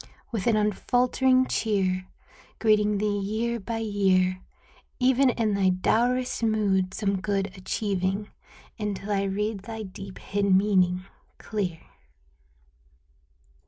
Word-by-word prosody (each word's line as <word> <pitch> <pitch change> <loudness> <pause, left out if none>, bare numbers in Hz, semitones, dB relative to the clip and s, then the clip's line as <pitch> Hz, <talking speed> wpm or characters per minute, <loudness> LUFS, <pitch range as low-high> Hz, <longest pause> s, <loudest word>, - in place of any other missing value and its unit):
With 225 -2 -2
an 230 - +4
unfaltering 250 +5 +2
cheer. 190 -6 0 0.5
Greeting 210 -2 +3
thee 205 0 0
year 225 +4 -2
by 225 +3 -4
year. 190 -4 +1 0.6
Even 260 +1 +4
in 225 -3 0
thy 195 -1 +3
dourest 240 +8 +1
mood 200 -4 +1
some 200 -3 -1
good 195 -1 -1
achieving. 195 +1 -2 0.5
Until 210 -1 -3
I 200 -1 +1
read 205 +2 -2
thy 220 +3 -7
deep 195 0 -9
hid 200 -1 +1
meaning 185 -2 +2 0.3
clear. 185 -6 -3
205 Hz, 110 wpm, -26 LUFS, 190-220 Hz, 0.6 s, an